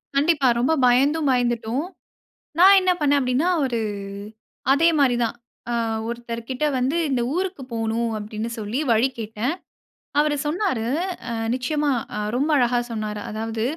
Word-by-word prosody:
கண்டிப்பா. 290 -1 +3
ரொம்ப 260 +7 +2
பயந்தும் 280 +5 +3
பயந்துட்டோம். 240 +3 0 0.7
நான் 390 +2 +8
என்ன 370 - +2
பண்ணேன் 290 -1 +3
அப்படீன்னா, 260 +6 +1 0.2
ஒரு 245 -3 -1 0.9
அதே 325 +4 +4
மாரி 270 -4 +4
தான், 230 - -1 0.3
அ - - 0 0.3
ஒருத்தர் 235 0 -5
கிட்ட 260 +4 -1
வந்து 260 +5 0
"இந்த 250 -3 +1
ஊருக்கு 365 -5 -2
போகணும்"அப்படீன்னு 225 -1 -2
சொல்லி 215 +4 -3
வழி 230 +4 +3
கேட்டேன். 225 +7 -2 0.7
அவரு 295 -1 +1
சொன்னாரு, 300 - -1 0.5
அ - - -2 0.2
நிச்சயமா, 290 +3 0 0.4
ரொம்ப 280 +5 +1
அழகா 245 -1 +2
சொன்னாரு. 215 -2 -4
அதாவது 220 +1 -3
250 Hz, 130 wpm, -23 LUFS, 230-295 Hz, 0.9 s, நான்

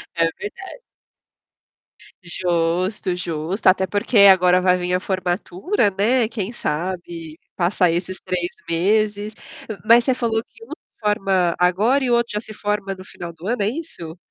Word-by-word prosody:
É 165 - +2
verda 380 - -8 1.5
Justo, 175 +2 -1
justo, 170 +4 -3
até 190 0 +5
porque 205 +3 +1
agora 180 -1 +4
vai 180 0 +3
vir 180 0 -2
a 180 - +2
formatura, 190 - -1
né, 235 +4 +3
quem 225 -1 -4
sabe 170 -2 -4 0.2
passa 180 -1 +2
esses 180 +2 -3
3 180 -1 -2 0.2
meses 205 +4 +1 0.5
mas 235 +1 +6
você 260 - +3
falou 225 -3 0
que 455 - -19
um - - -15 0.3
forma 195 -4 +1
agora 205 +10 +3
e 255 - 0
o - - +3
outro 235 0 0
já - - +1
se 215 0 -10
forma 205 -2 -2
no 185 - -11
final 175 -2 -9
do 165 +2 -13
ano, 230 0 -1
é - - +1
isso? 215 - -5
190 Hz, 155 wpm, -21 LUFS, 175-215 Hz, 1.5 s, mas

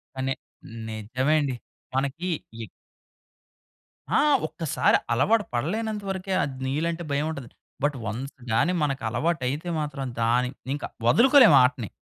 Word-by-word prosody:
కానీ, 135 0 -1 0.6
నిజమే 125 +7 0
అండి. 135 -3 -1 0.4
మనకి 140 +6 -1 0.4
ఎ - - -5 1.5
ఆ! - - +5 0.3
ఒక్కసారి 160 -2 +1 0.2
అలవాటు 210 - +3
పడలేనంత 210 - -2
వరకే 190 0 -3
అద్ 135 - -4
నీళ్ళంటే 165 +5 -1
భయవుంటది, 140 -3 -2 0.4
బట్ 145 -1 0
వన్స్ 120 +7 -5 0.2
గానీ 170 +11 +2
మనకలవాటైతే 140 +3 -1
మాత్రం 145 -2 -4 0.2
దాన్ని 125 +2 +2 0.2
ఇంక 145 - -8 0.2
వదులుకోలేము 245 - +7
ఆ - - +6
ఆటని. 120 -5 -7
140 Hz, 115 wpm, -25 LUFS, 130-170 Hz, 1.5 s, వదులుకోలేము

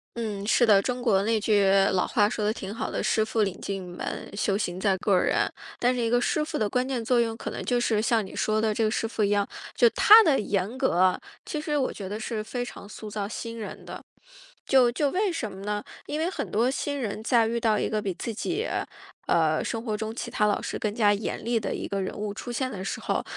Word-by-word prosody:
嗯， 210 -4 -4
是 240 +3 +4
的。 205 -3 +6
中 250 +3 -2
国 205 -6 +3
那 220 +1 +1
句 205 -1 +3 0.3
老 180 - +2
话 205 - +3
说 215 0 -3
得 210 - +2
挺 200 -1 -6
好 - - -3
的， - - -2
“师 220 - +2
傅 220 0 0
领 195 -2 -2
进 195 -1 -3
门， 180 -1 -6
修 200 -1 +1
行 180 -4 -3
在 190 0 +1
个 190 0 +2
人”。 - - +2 0.3
但 245 +1 +2
是 245 - -1
一 230 - +1
个 245 +1 +3
师 300 +5 +1
傅 305 0 -4
的 215 -2 0
关 250 +4 0
键 260 -3 -2
作 245 0 +3
用， 225 -1 -2
可 - - -5
能 - - -5
就 245 -1 +1
是 220 -3 +1
像 220 -1 +1
你 190 - -10
说 215 0 +1
的 220 -1 +1
这 225 - 0
个 215 - +2
师 225 - -1
傅 220 -1 -1
一 200 - +2
样， 205 -1 +2 0.3
就 240 - +5
他 435 +2 +8
的 300 -8 +3
严 200 +3 -1
格， 185 -9 +3 0.3
其 305 - -3
实 300 -1 -1
我 265 - 0
觉 195 -2 -7
得 210 +2 -4
是 220 -1 -3
非 245 +3 -4
常 205 -3 -10
塑 215 0 -8
造 205 -1 -3
新 230 +2 -6
人 220 - -7
的。 - - -8 0.6
就 255 -3 +5
就 280 +3 0
为 390 +1 +1
什 265 -10 -3
么 190 +1 -9
呢？ 210 +1 -2 0.2
因 300 - -3
为 325 - +1
很 - - -4
多 230 +4 +2
新 285 +1 -3
人 215 -3 -4
在 230 -1 +3
遇 235 +1 -1
到 220 -2 +2
一 - - 0
个 215 -1 -1
比 195 -2 -2
自 230 - -4
己， 370 - -2 0.6
呃， 155 -2 +2
生 225 - -3
活 220 -3 -2
中 220 +1 -4
其 230 - -5
他 210 - +2
老 205 - +1
师 - - -4
更 210 -1 -1
加 210 -2 +4
严 205 +1 -3
厉 235 0 +1
的 210 - -3
一 - - -4
个 200 -1 -2
人 190 - -3
物 205 -1 -4
出 240 +3 -7
现 255 +2 -1
的 195 -6 -6
时 195 - -3
候， - - -1
220 Hz, 280 characters per minute, -26 LUFS, 205-245 Hz, 0.6 s, 他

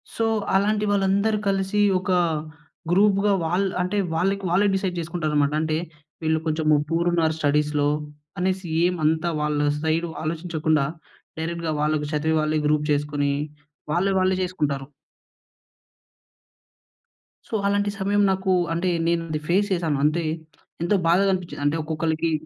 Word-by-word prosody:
So 225 - 0 0.3
అలాంటి 210 +2 +2
వాళ్ళందరూ 200 +2 +2
కలిసి, 195 +1 0 0.2
ఒకా 185 -1 +1 0.7
గ్రూప్‌గా 200 +1 +4
వాళ్ 180 +4 +1 0.2
అంటే 185 +3 -1 0.2
వాళ్ళకి 195 +4 0
వాళ్ళే 195 +4 +3
డిసైడ్ 190 -2 -2
జేసుకుంటారన్నమాట. 155 -3 0
అంటే 155 0 0 0.5
వీళ్ళు 160 0 +1
కొంచెం 155 0 -1 0.2
పూర్ 170 +1 +1
ఉన్నారు 160 -2 +2
స్టడీస్‌లో 150 0 +1 0.5
అనేసి 185 0 -1 0.2
ఏమంతా 160 -1 +1
వాళ్ళ 150 -1 0 0.2
సైడు 165 +2 0
ఆలోచించకుండా 155 -2 0 0.5
డైరెక్ట్‌గా 165 -1 -2
వాళ్ళకి 150 -1 0
చదివే 160 +2 +1
వాళ్ళే 155 0 0
గ్రూప్ 150 0 +1
చేసుకొని 145 -1 0 0.6
వాళ్ళే 190 +4 +1
వాళ్ళే 185 0 +2
జేసుకుంటారు. 145 -7 -2 2.6
సో - - -13
అలాంటి 205 0 +1
సమయం 205 +1 +1
నాకు 190 0 0 0.2
అంటే 175 +2 0 0.2
నేనది 165 -2 -1
ఫేస్ 200 +3 +3
చేశాను. 165 -5 0
అంటే 165 +2 +1 0.6
ఎంతో 195 +3 +2
బాధగా 195 +4 +4
అనిపించింది. 175 -5 -4
అంటే 150 +3 +2
ఒక్కొక్కళ్లకి 160 +1 -1
170 Hz, 125 wpm, -24 LUFS, 155-190 Hz, 2.6 s, గ్రూప్‌గా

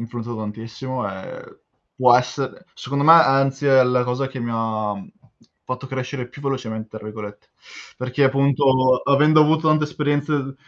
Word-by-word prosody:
influenzato 115 0 -6
tantissimo 115 +3 -6
e 95 -1 -10 0.4
può 125 -1 +6
essere 130 +6 -3
secondo 140 +2 -3
me 160 - +8
anzi 135 -3 +4
è 135 -1 +6
la 125 0 +1
cosa 125 +2 -2
che 135 -1 -8
mi 120 0 -4
ha, 110 -2 -2
mhmm, 100 - -11 0.6
fatto 130 +1 -6
crescere 130 -1 -5
"più 145 - -14
velocemente", 115 -5 -4
tra 105 - -14
virgolette, 105 -1 -9 0.5
perché 125 +2 0
appunto 130 -1 +2
avendo 150 +2 +4
avuto 155 +1 +2
tante 155 0 +3
esperienze 145 -2 -2
130 Hz, 150 wpm, -21 LUFS, 115-140 Hz, 0.6 s, me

